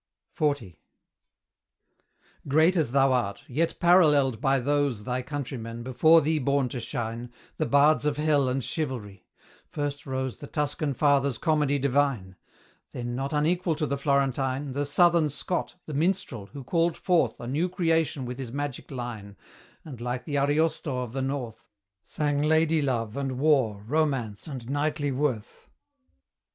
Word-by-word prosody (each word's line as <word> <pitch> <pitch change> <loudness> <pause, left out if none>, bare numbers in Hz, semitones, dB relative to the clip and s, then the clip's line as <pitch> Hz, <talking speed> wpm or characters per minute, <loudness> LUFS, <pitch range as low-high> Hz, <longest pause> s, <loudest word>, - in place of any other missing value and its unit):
XL. 145 -9 0 1.8
Great 160 +6 +4
as 155 -9 +1
thou 135 0 +4
art, 110 -6 -2
yet 160 +6 -1
paralleled 150 - +4
by 135 -1 +3
those 140 -4 0
Thy 125 +1 -2
countrymen, 125 -4 -5
before 155 +6 +5
thee 155 +1 +1
born 140 -1 +1
to 125 - -5
shine, 120 +1 -5 0.3
The 155 - 0
bards 145 0 +4
of 145 -1 0
Hell 150 -3 +2
and 130 +1 -1
Chivalry: 115 - -4 0.4
first 145 -1 -4
rose 130 -1 -3
The 145 - -9
Tuscan 145 -1 -2
father's 140 -3 +2
comedy 150 -3 +1
divine; 135 -8 0 0.6
Then, 120 0 -4
not 135 +2 -3
unequal 165 +3 +1
to 150 0 -1
the 140 - -1
Florentine, 140 -1 0
The 140 +2 -2
Southern 170 +1 +4
Scott, 175 +5 -3
the 155 - -7
minstrel 145 - -1
who 135 +7 -9
called 165 +4 +1
forth 165 - +1
A - - -7
new 150 +9 0
creation 165 -5 0
with 125 +1 -6
his 125 -4 -5
magic 145 0 -5
line, 115 -6 -7 0.5
And, 130 -7 -9
like 125 +1 -3
the 145 -3 -1
Ariosto 145 -2 0
of 120 -2 -8
the 135 - -2
North, 130 -5 -4 0.3
Sang 145 +4 -1
ladye 160 +1 +3
love 115 -6 -1
and 135 -2 -3
war, 130 -8 +2
romance 130 -6 -1
and 130 -6 -7
knightly 145 +1 -1
worth. 130 -5 -3
140 Hz, 150 wpm, -27 LUFS, 125-150 Hz, 1.8 s, before